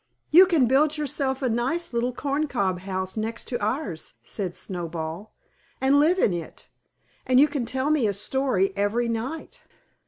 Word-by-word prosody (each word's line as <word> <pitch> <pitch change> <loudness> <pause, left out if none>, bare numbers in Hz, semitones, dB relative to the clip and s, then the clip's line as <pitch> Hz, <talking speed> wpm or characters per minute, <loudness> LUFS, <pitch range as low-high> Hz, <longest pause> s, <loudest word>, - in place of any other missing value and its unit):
"You 365 +5 +8
can 325 -8 +3
build 290 +5 +3
yourself 275 -2 -2
a - - +2
nice 250 +8 -1
little 235 +1 0
corncob 265 -9 -1
house 190 0 -4
next 225 +1 -4
to 240 -4 -3
ours," 210 - -3
said 185 -4 -4
Snowball, 170 +2 -5 0.5
"and 270 +2 +4
live 325 +5 +4
in 210 - +2
it; 170 -2 -7 0.6
and 255 0 +5
you 295 - +7
can 270 -6 -3
tell 265 +4 0
me 285 -8 +2
a 200 - 0
story 200 -2 0
every 205 +4 0
night." 260 - -5
240 Hz, 160 wpm, -25 LUFS, 200-285 Hz, 0.6 s, You